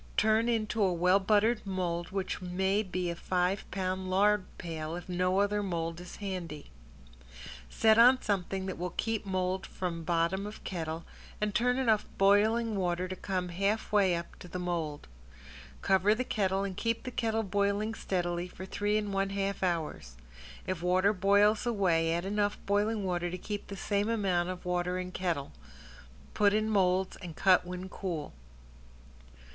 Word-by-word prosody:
Turn 220 +2 +3
into 220 -1 0
a 190 -2 +4
well 180 +3 +3
buttered 215 +3 +2
mold 175 -3 -2
which 190 -1 -3
may 190 +3 +1
be 180 -3 -2
a - - -4
five 180 +2 -1
pound 185 -1 -2
lard 200 +1 +3
pail, 160 -2 -5
if 175 - -8
no 180 +1 +1
other 205 +1 +1
mold 170 -3 -3
is 180 - -9
handy. 180 - -6 1.0
Set 220 - +4
on 250 +2 +7
something 195 -3 -2
that 190 -2 -5
will 180 0 -4
keep 225 -2 -1
mold 185 0 -1
from 170 -3 -4
bottom 170 +4 0
of 210 - -10
kettle 165 -2 -4 0.3
and 210 -1 -1
turn 250 +2 +2
enough 225 -5 +2
boiling 215 +3 +3
water 180 -1 0
to 185 - -4
come 185 -2 -3
half 195 +5 -1
way 195 -4 +4
up 170 0 -3 0.2
on 180 - -11
the 180 - -5
mold. 170 -5 -3 0.8
Cover 195 +2 +4
the 255 - -1
kettle 195 -5 0
and 195 -2 -3
keep 230 +3 -1
the 255 - -5
kettle 225 -2 0
boiling 200 +2 0
steadily 175 -4 -2
for 185 +1 -9
three 205 +2 0
and 205 -2 -2
one 195 0 +1
half 195 0 -2
hours. 155 - -2 0.5
If 185 -3 -3
water 185 +3 +3
boils 205 +3 +3
away 175 -8 +2
add 170 +2 -1
enough 205 +1 0
boiling 205 +1 +1
water 175 -1 -1
to 180 - -4
keep 205 +2 -5
the 200 - -7
same 205 +2 0
amount 190 -6 +1
of 185 -1 -6
water 180 0 0
in 180 0 -4
kettle. 170 -7 -2 0.8
Put 205 0 +3
in 215 0 +1
molds 190 -2 +2
and 170 -3 -8
cut 185 -2 +4
when 180 +1 -5
cool. 175 -6 -5
190 Hz, 170 wpm, -30 LUFS, 180-205 Hz, 1.0 s, on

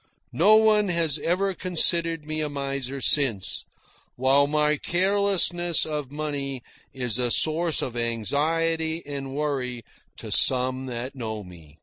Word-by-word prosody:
No 205 +6 +5
one 215 -1 +4
has 165 -4 0
ever 190 +5 -1
considered 170 -2 +2
me 155 0 -3
a 150 - -2
miser 140 -1 -4
since, 125 -9 +2 0.5
while 135 +3 +3
my 150 0 +1
carelessness 180 -1 +1
of 150 -4 -5
money 140 -4 -4 0.3
is 125 -3 -1
a 125 -1 +1
source 160 +4 +1
of 120 - -5
anxiety 160 +8 -1
and 140 -2 -6
worry 130 -5 -3 0.3
to - - -9
some 130 0 +2
that 125 +1 -6
know 110 -5 -6
me. 80 -5 -15
145 Hz, 130 wpm, -24 LUFS, 130-165 Hz, 0.5 s, No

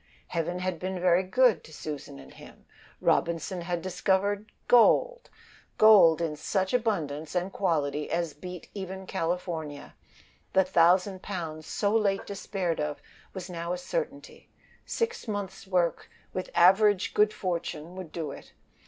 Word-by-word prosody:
Heaven 170 +1 -2
had 185 -2 -3
been 185 0 -3
very 180 0 +4
good 235 +4 +3
to - - -14
Susan 150 - -7
and 65 -1 -13
him. - - -15 0.4
Robinson 170 +2 0
had 175 0 -3
discovered 200 +3 0 0.2
gold; - - +4 0.5
gold 195 -7 +7
in 155 -2 -2
such 190 +6 -1
abundance 165 -11 -1
and 180 +2 -1
quality 150 -5 0
as 170 -3 -1
beat 180 +3 -9
even 190 -1 -6
California. 165 -5 -3 0.6
The 190 - +5
thousand 185 +2 +3
pounds, 160 -5 -5
so 205 +1 0
late 200 -3 +1
despaired 190 -4 -3
of, 150 -1 -2 0.4
was 185 -1 -5
now 170 -1 -4
a - - -2
certainty. 465 - -5 0.4
Six 465 - -2
months' 200 -2 -5
work, 180 -3 0 0.2
with 185 - -4
average 195 +3 +5
good 210 0 +4
fortune, 175 -3 -4
would 185 -4 -8
do 160 -4 -4
it. - - -12
180 Hz, 140 wpm, -28 LUFS, 165-200 Hz, 0.6 s, gold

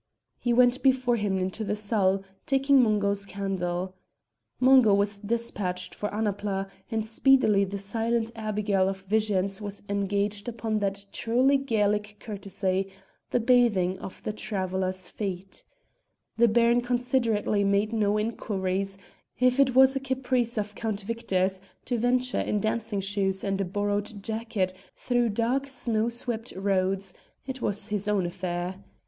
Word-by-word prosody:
He 240 - 0
went 245 +1 +4
before 260 -2 +3
him 205 -3 0
into 190 +4 -2
the 210 - -1
salle, 200 -2 +1 0.2
taking 270 0 +4
Mungo's 205 -3 +1
candle. 185 -2 -3 0.7
Mungo 255 -5 +6
was 200 0 0
despatched 205 -4 -3
for 210 - -3
Annapla, 205 -2 -2 0.2
and 220 -2 -1
speedily 220 -3 +4
the 200 +1 -5
silent 225 +3 -1
abigail 210 -3 0
of 190 0 -5
visions 200 -1 0
was 205 -1 -6
engaged 200 +1 -1
upon 225 -2 -2
that 200 0 -2
truly 250 +4 +2
Gaelic 210 -5 0
courtesy, 195 -2 -2 0.4
the - - +1
bathing 220 -7 +3
of 190 - -9
the 215 - -2
traveller's 185 -3 -2
feet. 190 -2 -5 0.7
The 235 +1 +5
Baron 235 +2 +4
considerately 240 -4 +1
made 200 +2 +1
no 210 -2 +2
inquiries; 195 -3 -2 0.4
if 250 +1 +3
it 260 -2 +4
was 265 +1 +7
a - - +1
caprice 255 -3 -1
of 210 0 -2
Count 215 -1 -3
Victor's 190 -3 -1 0.2
to 245 -2 -1
venture 250 +2 +1
in 210 - 0
dancing 220 -1 -1
shoes 195 -1 -1
and 195 -1 -1
a - - 0
borrowed 205 +2 -2
jacket 220 -4 -2 0.2
through 245 -2 +1
dark 235 +6 0
snow 235 -4 -1
swept 235 -1 -4
roads, 195 -1 0 0.3
it 265 -1 -6
was 205 - -2
his 205 -1 -2
own 205 -3 +2
affair. 180 +1 -4
210 Hz, 140 wpm, -27 LUFS, 195-235 Hz, 0.7 s, was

